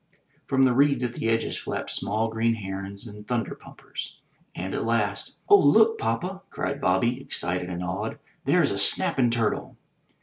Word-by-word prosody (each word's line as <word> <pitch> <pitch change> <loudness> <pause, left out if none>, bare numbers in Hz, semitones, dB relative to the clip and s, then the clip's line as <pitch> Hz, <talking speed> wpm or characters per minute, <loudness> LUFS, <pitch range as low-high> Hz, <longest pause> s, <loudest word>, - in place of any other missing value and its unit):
From 135 0 +4
the 125 - +3
reeds 140 0 +3
at 120 -1 -2
the 115 - -2
edges 115 0 0
flapped - - -4
small 110 +3 0
green 115 +1 +1
herons 100 0 -5
and 105 -1 -10
thunder 120 -2 -1
pumpers. - - -9 0.4
And 95 +2 -4
at - - -1
last 105 -3 -1
*'0h, 205 -1 +7
look, 220 +10 +5
papa!*' 180 +13 -2
cried 140 +1 -3
Bobby, 120 +7 +1
excited 90 -7 -2
and 90 0 -4
awed. 90 +1 -3 0.3
"There's - - +3
a - - -2
snap'n' 125 -3 +4
turtle!" 115 -2 -1
115 Hz, 165 wpm, -26 LUFS, 100-130 Hz, 0.4 s, 0h